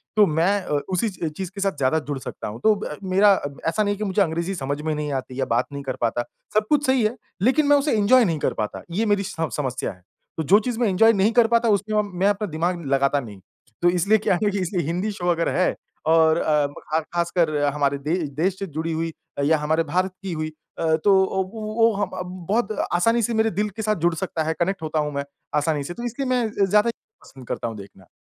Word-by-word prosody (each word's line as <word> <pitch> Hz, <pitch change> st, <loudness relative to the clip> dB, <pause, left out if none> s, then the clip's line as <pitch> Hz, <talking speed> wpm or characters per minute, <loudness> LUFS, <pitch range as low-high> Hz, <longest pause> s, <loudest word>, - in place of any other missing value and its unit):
तो 210 Hz, -1 st, +6 dB
मैं 175 Hz, +5 st, +1 dB
अ, -, -, -10 dB
उ -, -, +2 dB
उसी 200 Hz, +5 st, +1 dB
च 175 Hz, -4 st, -4 dB
चीज़ 190 Hz, -2 st, -4 dB
के 200 Hz, -, -5 dB
साथ 195 Hz, 0 st, +2 dB
ज़्यादा 135 Hz, +3 st, +2 dB
जुड़ 145 Hz, -2 st, -2 dB
सकता 130 Hz, -, -7 dB
हूँ, 105 Hz, +2 st, -7 dB
तो 215 Hz, -1 st, +5 dB
ब 200 Hz, -7 st, -5 dB
मेरा 200 Hz, +2 st, +5 dB
अ, 145 Hz, -, -2 dB, 0.2 s
ऐसा 215 Hz, +6 st, +1 dB
नहीं 205 Hz, 0 st, +1 dB
है -, -, -7 dB
कि 215 Hz, -, -3 dB
मुझे 200 Hz, 0 st, +1 dB
अंग्रेज़ी 170 Hz, +1 st, 0 dB
समझ 145 Hz, -1 st, -3 dB
में 155 Hz, 0 st, -1 dB
नहीं 150 Hz, -1 st, -3 dB
आती 130 Hz, 0 st, -4 dB
या 135 Hz, -, +1 dB
बात 115 Hz, +1 st, +1 dB
नहीं 140 Hz, -, -5 dB
कर 130 Hz, -2 st, -3 dB
पाता, 120 Hz, 0 st, +1 dB, 0.3 s
सब 215 Hz, 0 st, +2 dB
कुछ 295 Hz, -1 st, +3 dB
सही 260 Hz, -2 st, +3 dB
है। 215 Hz, +3 st, +1 dB, 0.3 s
लेकिन 265 Hz, +8 st, +3 dB
मैं 290 Hz, -, +6 dB
उसे 285 Hz, +1 st, +1 dB
एन्जॉय 240 Hz, +5 st, +5 dB
नहीं 165 Hz, -5 st, -1 dB
कर -, -, 0 dB
पाता 105 Hz, -1 st, -4 dB
ये 210 Hz, +7 st, 0 dB
मेरी 205 Hz, -2 st, +2 dB
स 200 Hz, -, -6 dB, 0.2 s
समस्या 130 Hz, -3 st, -2 dB
है। 90 Hz, -, -16 dB, 0.4 s
तो 160 Hz, -, -1 dB
जो 195 Hz, +7 st, +5 dB
चीज़ 235 Hz, +1 st, -3 dB
मैं 240 Hz, -, +2 dB
एन्जॉय 225 Hz, +4 st, +5 dB
नहीं 200 Hz, +2 st, +3 dB
कर 240 Hz, -1 st, +5 dB
पाता 235 Hz, 0 st, +2 dB
उसमें 210 Hz, +1 st, +2 dB, 0.2 s
मैं 195 Hz, -, +3 dB
अपना 205 Hz, +1 st, 0 dB
दिमाग 170 Hz, +1 st, -2 dB
लगाता 140 Hz, +1 st, +2 dB
नहीं। 105 Hz, -7 st, -9 dB, 0.4 s
तो 175 Hz, -, +5 dB
इसलिए 180 Hz, +5 st, +3 dB
क्या 205 Hz, -3 st, +1 dB
है 210 Hz, -, +3 dB
कि 200 Hz, -, -2 dB
इसलिए 180 Hz, -3 st, -1 dB
हिंदी 180 Hz, +6 st, -1 dB
शो 180 Hz, -3 st, -4 dB
अगर 170 Hz, 0 st, 0 dB
है 185 Hz, -, +2 dB, 0.3 s
और 160 Hz, 0 st, +5 dB
अ, 150 Hz, -3 st, +2 dB
ख 155 Hz, +2 st, -3 dB
खासकर 170 Hz, -2 st, +1 dB, 0.2 s
हमारे 140 Hz, -1 st, +1 dB
दे 150 Hz, +4 st, -1 dB, 0.3 s
देश 190 Hz, +2 st, +1 dB
से 195 Hz, -, -2 dB
जुड़ी 160 Hz, +1 st, -3 dB
हुई 165 Hz, +1 st, -2 dB, 0.3 s
या 160 Hz, +2 st, +4 dB
हमारे 155 Hz, +2 st, +1 dB
भारत 185 Hz, +4 st, 0 dB
की 190 Hz, -, -4 dB
हुई 155 Hz, -1 st, -3 dB, 0.3 s
अ, 160 Hz, -1 st, +2 dB
तो 200 Hz, -, +5 dB, 0.4 s
वो 225 Hz, +1 st, +1 dB
हम 200 Hz, -1 st, -1 dB
अब 180 Hz, 0 st, -5 dB, 0.2 s
बहुत 220 Hz, +1 st, +1 dB, 0.2 s
आसानी 230 Hz, +7 st, +3 dB
से 230 Hz, +2 st, 0 dB
मेरे 220 Hz, 0 st, +2 dB
दिल 210 Hz, -, 0 dB
के 210 Hz, +2 st, -7 dB
साथ 215 Hz, 0 st, +1 dB
जुड़ 175 Hz, -, +3 dB
सकता 165 Hz, -2 st, -2 dB
है, 160 Hz, +1 st, -1 dB
कनेक्ट 180 Hz, +1 st, 0 dB
होता 155 Hz, 0 st, -1 dB
हूँ 150 Hz, 0 st, -1 dB
मैं 140 Hz, 0 st, -2 dB, 0.3 s
आसानी 150 Hz, -1 st, 0 dB
से, 175 Hz, -, -6 dB
तो 235 Hz, -, -8 dB
इसलिए 250 Hz, +3 st, -3 dB
मैं 250 Hz, -2 st, +2 dB
ज़ 200 Hz, -, 0 dB
ज़्यादा 210 Hz, +3 st, +4 dB, 0.3 s
पसंद 130 Hz, -2 st, -14 dB
करता -, -, -3 dB
हूँ 115 Hz, -1 st, -6 dB
देखना। 95 Hz, -2 st, -13 dB
180 Hz, 250 wpm, -23 LUFS, 155-210 Hz, 0.4 s, तो